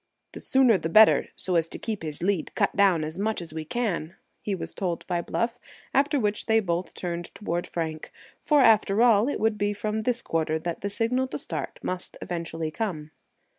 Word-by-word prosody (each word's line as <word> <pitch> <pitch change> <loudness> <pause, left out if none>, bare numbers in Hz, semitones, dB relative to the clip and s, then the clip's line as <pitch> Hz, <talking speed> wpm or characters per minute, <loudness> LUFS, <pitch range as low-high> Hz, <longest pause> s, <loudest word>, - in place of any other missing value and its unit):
"The - - -9
sooner 255 -7 +4
the 165 - -3
better, 215 +6 +6
so 185 - -3
as 165 -1 +2
to - - -4
keep 220 -3 -4
his 155 0 -5
lead 190 -3 -1
cut - - +1
down 190 -5 +4
as 155 +4 -5
much 220 +2 0
as 170 -3 -8
we 160 -1 -5
can," 180 -6 -2 0.3
he 205 - -2
was 180 - -6
told 175 -4 -3
by 175 -2 -1
Bluff, 230 +7 -2 0.3
after 285 +1 +3
which 210 -2 -1
they 225 0 +4
both 175 -3 -2
turned 175 -1 -4
toward 175 -4 -3
Frank, 160 -2 -4 0.3
for, 295 -2 +4
after 215 -2 +5
all, 225 -1 +5
it - - -2
would 220 -1 +1
be 205 0 +1
from 210 +1 -2
this 240 +1 -1
quarter 160 -1 0
that 165 +1 -4
the 200 - -2
signal 240 +5 0
to - - -5
start - - -5
must 185 0 -4
eventually 165 -2 -4
come. 155 -6 -4
195 Hz, 205 wpm, -26 LUFS, 165-220 Hz, 0.3 s, better